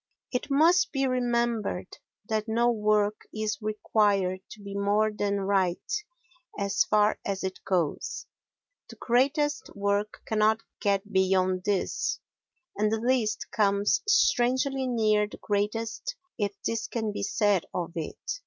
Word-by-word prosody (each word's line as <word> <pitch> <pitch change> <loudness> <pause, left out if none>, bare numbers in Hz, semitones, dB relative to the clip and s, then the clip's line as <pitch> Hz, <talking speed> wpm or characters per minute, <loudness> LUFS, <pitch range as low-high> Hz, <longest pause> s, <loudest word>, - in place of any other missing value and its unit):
It 250 +2 -2
must 330 +6 +4
be 270 -2 0
remembered 235 -6 -1 0.3
that 215 0 -1
no 235 +2 +2
work 210 -1 +1
is 215 0 -3
required 205 -3 +1
to - - -11
be 200 0 -7
more 205 +2 +2
than 200 -1 -1
right 190 - 0 0.6
as 200 -1 +2
far 210 0 +3
as 195 -1 -3
it 190 0 -3
goes; 175 -6 -1 0.6
the - - -10
greatest 280 +5 +1
work 200 +1 -1
cannot 220 +1 +2 0.2
get 200 0 0
beyond 185 -1 +2
this 200 -3 0 0.6
and 210 +1 +1
the 225 - +1
least 235 -3 0
comes 200 -1 +2
strangely 265 - +2
near 215 -3 +2
the - - -11
greatest 220 - -2 0.2
if 205 -2 -1
this 230 -1 -1
can 220 -3 -2
be 205 - -5
said 200 -2 +1
of 175 -1 -3
it. 165 -2 -5
210 Hz, 135 wpm, -27 LUFS, 200-235 Hz, 0.6 s, must